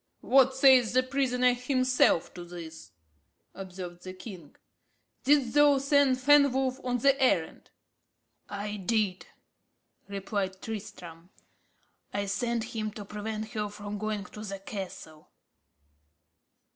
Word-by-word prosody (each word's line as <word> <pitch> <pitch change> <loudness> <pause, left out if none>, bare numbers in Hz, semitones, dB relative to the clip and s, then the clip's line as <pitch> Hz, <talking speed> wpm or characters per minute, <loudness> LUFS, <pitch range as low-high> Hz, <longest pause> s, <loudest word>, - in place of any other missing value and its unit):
"What 265 0 +4
says 260 -4 +5
the 255 0 +4
prisoner 255 -2 +1
himself 255 - +2
to 175 - -8
this?" 165 - -10 0.6
observed 180 -2 -8
the 185 - -7
king. 185 -5 -11 0.7
"Didst 275 -4 +3
thou 290 -1 +5
send 275 -1 +3
Fenwolf 265 -1 +3
on 250 -1 0
the 275 +3 +2
errand?" 260 - +1 0.8
"I 205 +1 -4
did," 200 -1 -1 0.8
replied 195 -1 -3
Tristram. 180 -6 -8 0.8
"I 200 0 -2
sent 235 +3 -2
him 215 -1 -2
to 210 -2 -8
prevent 215 +1 -5
her 210 -1 -3
from 205 0 -7
going 215 -1 -3
to 210 - -11
the 200 -2 -5
castle." 190 -6 -8
215 Hz, 115 wpm, -28 LUFS, 195-255 Hz, 0.8 s, says